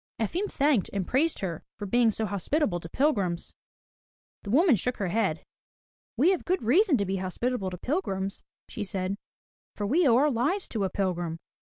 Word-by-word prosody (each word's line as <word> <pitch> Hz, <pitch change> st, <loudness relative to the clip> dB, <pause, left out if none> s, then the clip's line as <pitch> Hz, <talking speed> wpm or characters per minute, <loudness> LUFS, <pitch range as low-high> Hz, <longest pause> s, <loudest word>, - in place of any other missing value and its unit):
Efim 340 Hz, -, -1 dB
thanked 275 Hz, -8 st, +2 dB
and 195 Hz, -2 st, -1 dB
praised 310 Hz, -, +1 dB
her 170 Hz, -5 st, -4 dB
for 205 Hz, -, -5 dB
being 235 Hz, +3 st, +3 dB
so 220 Hz, +1 st, -1 dB
hospitable 205 Hz, -, 0 dB
to 165 Hz, -, -9 dB
pilgrims. 200 Hz, -, 0 dB, 0.9 s
The 200 Hz, -, -8 dB
woman 295 Hz, -, +5 dB
shook 245 Hz, +6 st, -2 dB
her 195 Hz, -4 st, -1 dB
head. 190 Hz, -6 st, 0 dB, 0.7 s
"We 310 Hz, +10 st, +5 dB
have 375 Hz, -, -1 dB
good 370 Hz, -6 st, 0 dB
reason 310 Hz, -, +4 dB
to 200 Hz, -, 0 dB
be 195 Hz, +1 st, -1 dB
hospitable 190 Hz, +3 st, -2 dB
to 180 Hz, -, -7 dB
pilgrims," 195 Hz, -, -2 dB, 0.3 s
she 215 Hz, -, -5 dB
said. 190 Hz, -1 st, -2 dB, 0.6 s
"For 205 Hz, -, -3 dB
we 310 Hz, -, +3 dB
owe 235 Hz, -, +5 dB
our 295 Hz, +3 st, +4 dB
lives 290 Hz, -, 0 dB
to 210 Hz, -4 st, -1 dB
a -, -, -1 dB
pilgrim. 175 Hz, -4 st, -2 dB
220 Hz, 180 wpm, -28 LUFS, 190-285 Hz, 0.9 s, woman